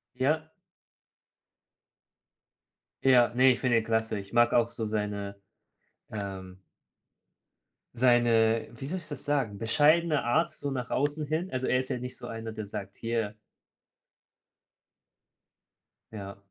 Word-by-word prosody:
Ja. 155 +5 0 2.5
Ja, 125 -3 +6
ne, 130 +1 +6
ich - - -6
finde 120 -2 +2
ihn 115 - +1
klasse. 110 -1 0
Ich 100 +1 -11
mag 120 0 +4
auch 120 -1 +3
so 115 -1 -4
seine, 105 -2 -3 0.7
ähm 95 -3 -6 1.3
seine 115 -2 +3
wie 120 +3 -8
soll 185 +6 -3
ich 160 - -11
das 145 - -6
sagen, 135 -8 0
bescheidene 150 +8 +3
Art 135 +8 +2
so 140 - -5
nach 125 -2 -4
außen 145 +2 0
hin. 160 +5 -2
Also, 130 0 -2
er 130 - +3
ist 130 - -4
ja 130 - -1
nicht 125 +1 -7
so 120 - -8
einer, 115 -1 -6
der 110 -1 -6
sagt: 100 -1 -7
„Hier.“ 115 -2 -2 2.8
Ja. 100 -2 -8
120 Hz, 130 wpm, -29 LUFS, 110-135 Hz, 2.8 s, Ja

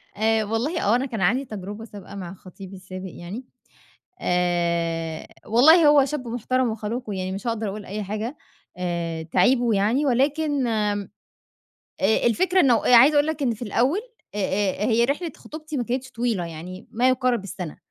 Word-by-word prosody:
آآ 220 +1 +2
والله 230 - -1
آه، 210 +4 +3
أنا 255 - 0
كان 225 -6 -4
عندي 245 +9 +2
تجربة 210 0 -7
سابقة 200 -2 -11
مع 185 -2 -6
خطيبي 190 +1 -12
السابق 185 0 -8
يعني 200 +9 -8 0.8
آآ، 170 -2 0 0.2
والله 305 +9 +6
هو 290 -2 +6
شاب 270 -4 -4
محترَم 245 +1 0
وخلوق 220 +2 -4
ويعني 185 -1 -3
مش 195 +6 -6
هاقدَر 225 -2 -1
أقول 205 +1 -6
أي 210 +2 -5
حاجة 215 +7 -4 0.4
آآ 170 -2 -3
تعيبه 240 +8 +2
يعني 225 +9 +2
ولكن 285 +2 +1
آمم، 210 -3 -1 0.9
آآ، 215 +3 +2
الفكرة 360 +10 +3
إن 270 -7 +5
عايزة 250 +5 +6
أقول 290 +1 +4
لك 315 -2 -3
إن 240 -3 +1
في 220 - -13
الأول 245 - +1 0.4
أ - - -4
أ 200 0 0
هي 235 +1 +3
رحلة 300 +6 -2
خطوبتي 310 -1 -8
ما 245 - 0
كانتش 255 +3 -3
طويلة 230 -7 -1
يعني 170 +3 -9
ما 250 +3 +2
يقارِب 250 -4 +1
السنة. 180 -5 -7
225 Hz, 170 wpm, -24 LUFS, 190-255 Hz, 0.9 s, والله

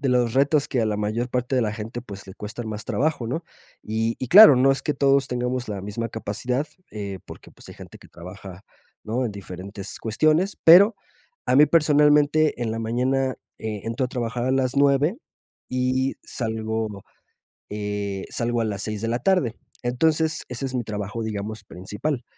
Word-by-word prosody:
de 135 - 0
los 120 -2 +2
retos 140 +2 +2
que 125 - 0
a 110 - +1
la 105 -1 -1
mayor 110 +4 -2
parte 125 +1 -1
de - - +3
la 105 -1 -1
gente, 115 +2 -6
pues, 100 -5 -10
le 95 - -9
cuestan 110 +2 -7
más 110 0 -5
trabajo, 145 -5 -1
¿no? 160 +9 -3 0.4
Y 110 +1 -1
y 130 - -3
claro, 205 -4 +10
no 135 +2 +4
es 135 - +1
que 150 - -1
todos 135 0 +3
tengamos 125 -1 -2
la 100 -2 -4
misma 115 +3 -4
capacidad, 125 +6 -2 0.3
eh, 100 -3 -5
porque, - - -12
pues, - - -15
hay - - -10
gente - - -12
que - - -16
trabaja, 90 +2 -11 0.4
¿no? 120 +4 -2
En 105 - -5
diferentes 100 +1 -8
cuestiones, 155 - +1
pero 195 +7 +8 0.5
a 130 - +3
mí 150 +1 +8
personalmente 150 -2 +4
en 115 - -1
la 115 - -3
mañana, 130 +3 0 0.2
eh, 110 -2 -4
entro 115 +3 -1
a - - -12
trabajar 120 -1 -3
a 130 - +1
las 130 0 0
9 140 - +3 0.5
y 130 +1 0
salgo, 110 -3 -3 0.7
eh, 105 -2 -4
salgo 120 0 -1
a - - +1
las 100 -2 -3
6 105 -1 -4
de 115 - -1
la 120 +1 0
tarde. 140 - +1 0.3
Entonces, 155 +6 +1
ese 125 +2 -4
es 130 - -6
mi 120 - -2
trabajo, 105 +1 -4
digamos, 105 0 -5
principal. 105 - -4
120 Hz, 190 wpm, -24 LUFS, 105-135 Hz, 0.7 s, claro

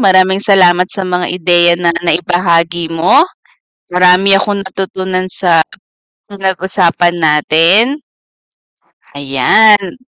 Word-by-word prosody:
maraming 190 -2 +2
salamat 180 -3 +2
sa 195 - -5
mga 180 -1 -3
ideya 175 -1 +1
na 170 -1 -1
nai-bahagi 170 0 -1
mo, 175 - +1 0.6
marami 180 +2 +3
akong 200 0 0
natutunan 190 -1 -5
sa 175 -3 0 0.7
pinag-usapan 190 -3 -1
natin. 170 - +1 1.1
Ayan. 195 - +1
180 Hz, 90 wpm, -11 LUFS, 175-195 Hz, 1.1 s, marami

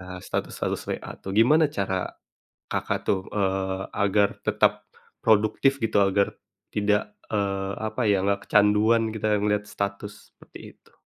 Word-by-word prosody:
eee, 90 0 -8
status-status - - -3
WA - - -5
tuh. 95 - -6
Gimana 150 +9 +5
cara 95 -5 -2 0.6
Kakak - - -1
tuh, 95 - +3
eee, 95 -1 -1 0.2
agar 100 0 +3 0.2
tetap - - +2 0.4
produktif 110 +5 +3
gitu? 115 -2 0
Agar 100 +1 +1 0.3
tidak, 105 0 0 0.2
eee, 100 -2 -1
apa 110 +3 -3
ya, 100 -3 +3
nggak 100 +1 -1
kecanduan 105 +2 +3
kita 110 -1 0
melihat 105 0 0
status, 100 0 -5
seperti - - -14 0.2
itu? - - -28
105 Hz, 135 wpm, -25 LUFS, 100-110 Hz, 0.6 s, Gimana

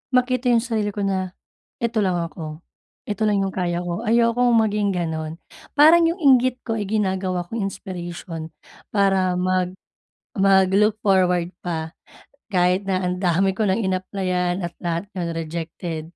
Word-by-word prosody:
makita 255 0 +2
yung 235 -2 +4
sarili 215 -4 -2
ko 205 - -2
na 190 -2 -2 0.5
"Eto 235 -1 0
lang 185 -3 +1
ako, 165 -1 -5 0.4
eto 215 +1 -1
lang 200 -2 +2
yung 195 - -2
kaya 175 -1 -2
ko", 175 +2 -3
ayokong 235 +1 +3
maging 210 -3 +2
ganun. 160 -2 -3 0.4
Parang 325 +3 +7
yung 335 +1 -3
inggit 255 -2 +4
ko 225 -1 -2
ay 205 - -3
ginagawa 190 -4 -1
kong 230 - -3
inspiration 175 -4 -7 0.5
para 190 -2 +3
mag 185 0 0 0.6
mag 190 -1 +4
look 210 +2 +3
forward 180 -2 +2
pa 160 -2 -4 0.6
kahit 180 +2 +2
na 190 -1 0
ang 180 -1 -1
dami 185 +1 +1
ko 220 - +1
nang 200 +3 +1
inapplyan 185 -1 -1
at 170 - -9
lahat 170 +2 -2
yun 170 -2 -2
rejected, 165 0 -5
190 Hz, 150 wpm, -22 LUFS, 175-215 Hz, 0.6 s, Parang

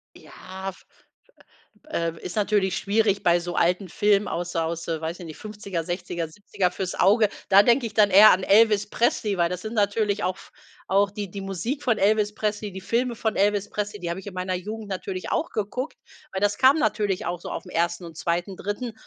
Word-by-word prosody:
Ja, 190 +1 -8
f 185 - -13 1.1
äh, 170 - -1
ist 175 - -6
natürlich 200 -2 +1
schwierig 205 0 +1
bei 175 0 +4
so 175 0 -5
alten 180 +2 +1
Filmen, 205 +1 +2
aus 175 +1 -4
aus, 165 +1 -2
weiß 165 +1 -3
ich 175 - -8
nicht, 155 -2 -9
50er, 200 -5 -5
60er, 175 -1 -4
70er, 190 0 -2
fürs 185 -1 -4
Auge. 210 +3 +4 0.2
Da 195 +1 +8
denke 240 +3 +3
ich 225 - -5
dann 210 -2 +5
eher 205 +3 +9
an 185 - +2
Elvis 210 0 +4
Presley, 210 -4 0
weil 170 -1 +2
das 180 0 -4
sind 220 +1 -6
natürlich 205 -1 +1
auch 185 +1 -1 0.5
auch 200 +1 +2
die 205 -2 -5
die 200 - -6
Musik 195 - -3
von 235 -4 +2
Elvis 210 +1 +2
Presley, 210 -1 -2
die 190 - -7
Filme 235 +4 0
von 220 -1 -1
Elvis 205 0 +1
Presley, 210 0 -4
die 175 - -4
habe 170 +3 -3
ich 195 - -12
in 200 - -7
meiner 185 0 -2
Jugend 215 +4 -6
natürlich 185 -1 -4
auch 325 - 0
geguckt, 235 +7 -4 0.3
weil 190 - -3
das 205 0 +1
kam 265 +3 +6
natürlich 210 -6 0
auch 175 0 -3
so - - -8
auf'm 180 - -6
1. 170 +1 -1
und 165 -1 -10
2. 175 +3 -2
3. 220 +4 -4
200 Hz, 205 wpm, -25 LUFS, 180-210 Hz, 1.1 s, eher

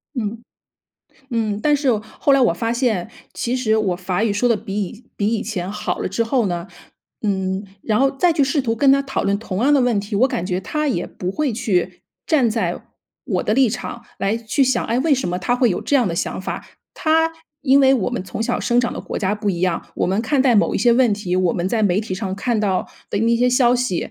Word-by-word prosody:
嗯， 230 -1 -3 0.9
嗯， 215 -3 -1
但 295 +2 +3
是 280 -2 +1 0.3
后 280 - +3
来 275 - +5
我 240 -8 +4
发 230 +6 -1
现 230 -6 0 0.2
其 240 - -2
实 220 -4 +1
我 195 -5 0
法 185 +3 -1
语 220 - +1
说 210 +5 +1
的 230 - +3
比 205 0 -3
以 210 +5 -7
比 205 - 0
以 220 -1 0
前 190 -4 -4
好 210 - -3
了 - - -2
之 210 +5 0
后 230 -1 +1
呢， 175 -1 -3 0.6
嗯， 190 -1 -1 0.2
然 215 0 +1
后 270 0 +4
再 335 +6 +2
去 310 - +2
试 275 +2 +1
图 225 -3 0
跟 275 +4 +4
他 275 +1 +5
讨 275 -1 -2
论 200 0 +1
同 210 -2 -3
样 285 +3 +4
的 280 - +4
问 245 -5 +2
题， 205 +1 -4
我 255 +6 +4
感 175 - -2
觉 180 -1 -1
他 300 +8 -2
也 180 -10 -1
不 180 - -5
会 280 +5 -1
去 190 -6 -1 0.2
站 275 -8 +3
在 195 -6 -2 0.4
我 185 -8 -1
的 - - 0
立 265 0 +4
场 240 +1 -6
来 200 +3 0
去 230 +5 +1
想， 260 0 +1
哎， 235 - 0
为 295 +1 +3
什 255 -9 -2
么 180 +1 -2
她 215 +7 0
会 245 -2 +3
有 - - -1
这 - - -1
样 245 -7 +2
的 170 - -2
想 170 - -2
法。 190 - -5 0.3
他 320 0 +2 0.3
因 275 0 +5
为 265 -1 +5
我 245 -8 +1
们 245 -6 -3
从 185 +3 -7
小 240 +1 -1
生 240 - +1
长 240 - -1
的 - - -5
国 - - -5
家 200 0 0
不 210 -1 -1
一 175 -3 -3
样， 180 -2 0
我 - - +1
们 195 +5 0
看 275 +3 +1
待 260 -2 +4
某 205 - +3
一 - - +1
些 240 - +4
问 240 -2 +4
题， 200 -3 -2
我 185 -2 +2
们 175 +1 -1
在 220 +1 0
媒 200 -1 +2
体 210 -4 -4
上 190 -1 -4
看 225 +2 0
到 195 -3 0 0.2
的 - - -1
那 230 +2 +2
些 250 +1 +2
消 245 -1 +4
息， 245 -8 -1
225 Hz, 270 characters per minute, -20 LUFS, 195-255 Hz, 0.9 s, 来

